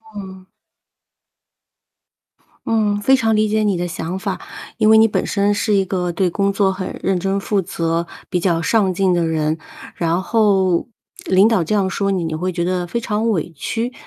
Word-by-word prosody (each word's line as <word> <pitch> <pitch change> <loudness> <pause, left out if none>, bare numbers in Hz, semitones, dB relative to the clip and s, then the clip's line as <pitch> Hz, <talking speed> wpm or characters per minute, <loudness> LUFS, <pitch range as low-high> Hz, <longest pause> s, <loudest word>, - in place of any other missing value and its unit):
嗯。 190 -2 -9 2.2
嗯， 210 -2 +1
非 265 +6 +4
常 225 -4 +1
理 215 0 +2
解 215 +1 +1
你 205 -3 +1
的 175 +1 -2
想 175 +2 -4
法。 195 -1 -4 0.4
因 215 -1 +3
为 220 - +7
你 225 - +6
本 210 - -1
身 205 0 +1
是 210 +1 +1
一 195 -1 +2
个 180 -2 -2
对 180 +1 0
工 200 +2 +1
作 195 -1 +1
很 185 -1 -6
认 190 -2 +1
真 195 +2 -1
负 200 0 0
责、 170 -2 -2 0.2
比 180 - 0
较 170 -2 +1
上 195 +2 +2
进 185 0 +1
的 170 -1 +1
人。 160 0 -1 0.4
然 170 +2 0
后 195 -5 +2 0.4
领 190 +2 +5
导 220 -6 +2
这 190 +7 -1
样 195 -2 +2
说 200 +1 -1
你， 190 -3 0
你 160 -1 -3
会 180 +4 -2
觉 170 -1 -2
得 180 0 -1
非 235 - -2
常 220 0 -1
委 175 -5 -1
屈。 230 - -3
190 Hz, 205 characters per minute, -19 LUFS, 175-210 Hz, 2.2 s, 为